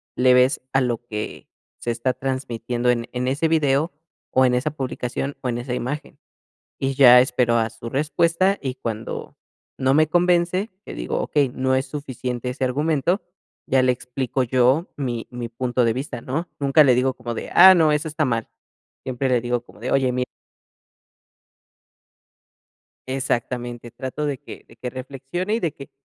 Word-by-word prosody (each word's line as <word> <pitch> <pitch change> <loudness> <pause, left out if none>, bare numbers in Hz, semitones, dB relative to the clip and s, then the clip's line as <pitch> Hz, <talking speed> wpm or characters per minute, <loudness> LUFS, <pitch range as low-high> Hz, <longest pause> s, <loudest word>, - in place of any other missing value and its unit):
le 125 0 +5
ves, 125 +4 +4
a 135 - +4
lo 120 -2 0
que 105 -2 -6 0.3
se 120 - -2
está 120 +2 -1
transmitiendo 125 -2 -2
en 120 -1 +1
en 125 0 -2
ese 145 +5 +1
video, 155 0 +2 0.4
o 130 0 +4
en 125 0 +3
esa 140 +4 0
publicación, 135 -1 -4
o 125 - -2
en 120 - -1
esa 120 +1 -4
imagen? 135 +5 -4 0.6
Y 135 0 0
ya 125 -2 +9
espero 125 -2 +2
a 115 0 +1
su 115 0 -9
respuesta, 165 - +2
y 130 -2 -3
cuando 115 -4 -5 0.4
no 130 0 +2
me 155 +1 +4
convence, 175 +4 +2 0.2
le - - -7
digo: - - -3
"Okey, 145 -3 +1
no 130 +1 0
es 130 0 0
suficiente 125 -3 -4
ese 130 +1 -4
argumento", 150 +7 +1 0.4
ya 130 0 +3
le 130 0 +4
explico 125 +1 -2
yo 130 +6 +2
mi 120 -5 -3
mi 120 -1 -5
punto 125 +1 0
de 115 - +2
vista, 125 -2 -5
¿no? 160 +7 -3
Nunca 140 +2 +5
le 130 -3 +5
digo 130 +1 +2
como 120 -2 -6
de: - - -6
"Ah, 190 +2 +10
no, 160 -3 +4
eso 150 +2 0
está 155 0 -1
mal". 115 -3 -1 0.6
Siempre 130 +1 -2
le 125 -2 +2
digo 120 -1 -1
como - - -18
de: - - -4
"Oye, 130 -2 +3
mir" 125 0 -1 2.8
Exactamente, 120 -2 -3
trato 130 +4 -4
de 140 -3 -2
que 145 - -11
de - - -17
que 125 +2 -4
reflexione, 135 - -4
y - - 0
de 165 -8 -1
que 140 - -12
130 Hz, 175 wpm, -22 LUFS, 125-145 Hz, 2.8 s, Ah